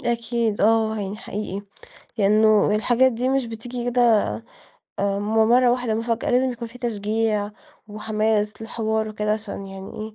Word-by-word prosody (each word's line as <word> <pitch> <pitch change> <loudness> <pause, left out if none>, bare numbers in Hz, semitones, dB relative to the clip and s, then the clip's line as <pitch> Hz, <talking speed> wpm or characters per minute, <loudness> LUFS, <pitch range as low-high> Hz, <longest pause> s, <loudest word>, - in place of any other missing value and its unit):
أكيد، 235 -2 -1
آه، 220 0 +3
يعني 200 +1 -4
حقيقي. 205 -3 -5 0.6
لأنه 215 +1 +4
الحاجات 250 +4 +3
دي 250 +3 -1
مش 270 -2 +1
بتيجي 235 +2 -6
كده 245 - +2 1.0
آآ 200 0 0
من 205 +1 -3 0.2
مرة 245 0 +5
واحدة 245 -3 0
مفاجأة، 230 0 -1
لازم 255 +1 +2
يكون 235 -1 -7
في 250 +2 -14
تشجيع 215 -2 -1 0.4
وحماس 215 0 -1
للحوار 220 -1 -2
وكده 210 0 -1
عشان 215 -2 -5
يعني 195 0 -9
إيه 215 0 -7
220 Hz, 150 wpm, -23 LUFS, 210-235 Hz, 1.0 s, مرة